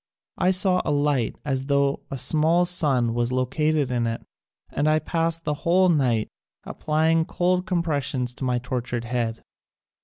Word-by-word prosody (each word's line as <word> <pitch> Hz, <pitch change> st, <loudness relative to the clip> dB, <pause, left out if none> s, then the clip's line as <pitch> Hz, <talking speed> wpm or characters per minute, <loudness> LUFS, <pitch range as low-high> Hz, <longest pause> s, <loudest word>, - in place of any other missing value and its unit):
I 180 Hz, -, +3 dB
saw 185 Hz, 0 st, +3 dB
a -, -, -3 dB
light 145 Hz, -5 st, 0 dB
as 135 Hz, -1 st, -2 dB
tho 140 Hz, -1 st, +1 dB
a 135 Hz, -, -5 dB
small 160 Hz, +6 st, +3 dB
sun 140 Hz, -10 st, +2 dB
was 120 Hz, +1 st, -1 dB
located 135 Hz, +2 st, 0 dB
in 120 Hz, -2 st, 0 dB
it 115 Hz, 0 st, -4 dB, 0.5 s
and 145 Hz, -, -1 dB
I 155 Hz, -, +3 dB
past 165 Hz, +1 st, -1 dB
the 150 Hz, -, -1 dB
whole 185 Hz, +2 st, +3 dB
night 125 Hz, -9 st, +1 dB, 0.4 s
applying 160 Hz, +1 st, 0 dB
cold 180 Hz, +2 st, 0 dB
compressions 145 Hz, -8 st, -1 dB
to -, -, -5 dB
my 125 Hz, -1 st, 0 dB
tortured 120 Hz, -1 st, -4 dB
head. 115 Hz, -1 st, -3 dB
145 Hz, 155 wpm, -24 LUFS, 125-165 Hz, 0.5 s, I